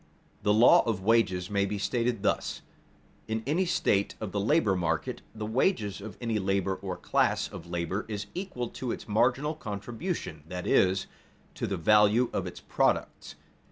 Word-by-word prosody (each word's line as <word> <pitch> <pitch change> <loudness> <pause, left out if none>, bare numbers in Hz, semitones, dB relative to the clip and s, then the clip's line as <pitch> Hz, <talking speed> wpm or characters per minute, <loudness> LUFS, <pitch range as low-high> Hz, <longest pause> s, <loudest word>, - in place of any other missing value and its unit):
_The 105 - +3
law 110 +4 +7
of 105 -5 -1
wages 95 -4 +2
may 100 -1 +2
be 105 +1 -3
stated 115 +1 -1
thus: - - -1 0.6
in 110 0 -2
any 165 +7 +1
state 100 - +1
of 105 -3 -5
the 100 - -1
labor 110 -2 +3
market 80 -4 -1
the 110 -1 -4
wages 110 - 0
of 110 +1 -8
any 115 -3 -1
labor 95 0 0
or 95 -1 -5
class - - +1
of - - -10
labor 85 +4 -2
is 105 -2 -4
equal 175 -11 -4
to 125 -3 -4
its - - -6
marginal 125 +8 +2
contribution 110 - -5
that 90 0 -5
is, 95 +1 +3 0.5
to - - -3
the 95 - -2
value 105 +7 +4
of - - -1
its - - -8
products. - - -1
105 Hz, 165 wpm, -29 LUFS, 95-120 Hz, 0.6 s, law